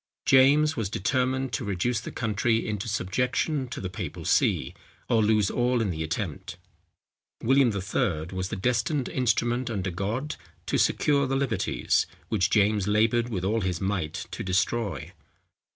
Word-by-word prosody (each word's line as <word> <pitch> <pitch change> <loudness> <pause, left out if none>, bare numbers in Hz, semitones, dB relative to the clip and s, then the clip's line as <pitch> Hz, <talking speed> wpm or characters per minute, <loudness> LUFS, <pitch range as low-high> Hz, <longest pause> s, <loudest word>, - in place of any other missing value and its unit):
James 145 +4 +5
was 110 -5 -2
determined 130 +6 0
to - - -1
reduce 100 +4 -1
the - - -7
country 115 0 0
into 105 -1 -3
subjection 125 - -1
to - - -6
the 95 - -4
papal 90 - -6
see, - - +2 0.3
or 115 -2 +3
lose 105 -2 +2
all 125 0 +1
in 110 -4 0
the 80 -2 -4
attempt. 85 +1 -4 0.9
William 135 +1 +4
III. 100 -4 -1
was 95 0 -2
the - - -3
destined 125 - 0
instrument 120 0 0
under 95 -4 -2
God, 110 - -3 0.3
to - - 0
secure 140 -2 +2
the 135 - -1
liberties, 135 -1 0 0.2
which 95 -5 +1
James 105 -1 +2
laboured 115 +3 +2
with 95 -5 -3
all 110 +3 +1
his 90 -3 -1
might 95 -6 -2
to - - -5
destroy. 95 -1 -1
110 Hz, 150 wpm, -26 LUFS, 95-125 Hz, 0.9 s, James